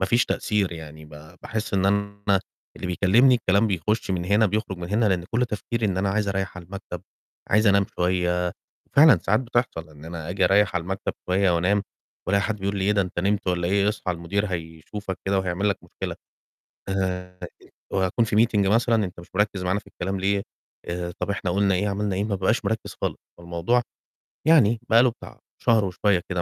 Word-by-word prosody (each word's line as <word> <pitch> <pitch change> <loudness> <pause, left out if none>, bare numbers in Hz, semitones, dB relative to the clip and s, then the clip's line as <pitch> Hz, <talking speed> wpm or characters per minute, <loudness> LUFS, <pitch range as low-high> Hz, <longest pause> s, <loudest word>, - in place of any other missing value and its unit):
ما 95 - +1
فيش 120 +4 +3
تأثير 100 -4 0
يعني 80 -2 -9
ب 75 - -16 0.3
باحس 110 -2 -3
إن 95 0 +2
أنا 100 0 +1 0.4
اللي - - -5
بيكلِّمني 105 +8 +4
الكلام 100 -2 +2
بيخُش 100 +2 -1
من 90 -2 -1
هنا 105 +4 +3
بيخرُج 100 -2 -2
من 85 - -6
هنا 110 +3 +2
لإن 90 -3 0
كل 120 +2 +2
تفكيري 115 +1 -2
إن 95 -3 -1
أنا 100 - +1
عايز 100 0 0
أريَّح 95 -1 -2
على 90 - -8
المكتب، 100 +2 -8 0.5
عايز 110 +2 +4
أنام 100 -1 +4
شوية، 90 0 +1 0.4
فعلًا 145 - +7
ساعات 105 +4 +2
بتحصل 120 -9 -2
إن 75 -1 -14
أنا 80 -1 -7
آجي 95 +1 +1
أريَّح 100 0 +3
على 90 - 0
المكتب 95 +3 -3 0.2
شوية 95 +1 +3
وأنام 95 +4 +2 0.4
وألاقي 100 +1 +2
حد 110 -1 -1
بيقول 100 +1 -2
لي: 95 - 0
"إيه 105 - +3
ده 100 - +3
أنت 90 -1 -6
نِمت 100 +2 0
والّا 85 -1 0
إيه؟ 100 +1 +2
اصحى 105 -3 -2
المدير 90 +5 -2
هيشوفك 90 +2 -6
كده 95 0 +1
وهيعمل 95 +2 0
لك 100 - 0
مشكلة." - - -6 0.7
آآ 90 -1 -2 0.5
وأكون 95 +4 +1
فيه 105 - 0
meeting 110 -3 +3
مثلًا، 115 -2 +3
"أنت 90 -1 -8
مش 85 - -12
مِركِّز 105 -2 0
معانا 90 +2 0
في - - -21
الكلام 95 +2 -4
ليه؟ 100 +1 +1 0.4
آآ 85 0 -4
طَب - - -2
إحنا 100 -2 -1
قُلنا 100 +1 +2
إيه، 100 +3 0
عملنا 100 -1 -1
إيه؟" 100 - 0
ما 105 -2 -1
بابقاش 95 +5 0
مِركِّز 110 0 -2
خالص. - - -1 0.2
فالموضوع 85 +8 0 0.7
يعني 120 -9 +5
بقى 115 +1 +6
له 125 - +4
بتاع 115 - -12 0.2
شهر 110 -3 +3
وشوية 95 0 +1
كده 90 -2 -1
100 Hz, 200 wpm, -24 LUFS, 90-105 Hz, 0.7 s, فعلًا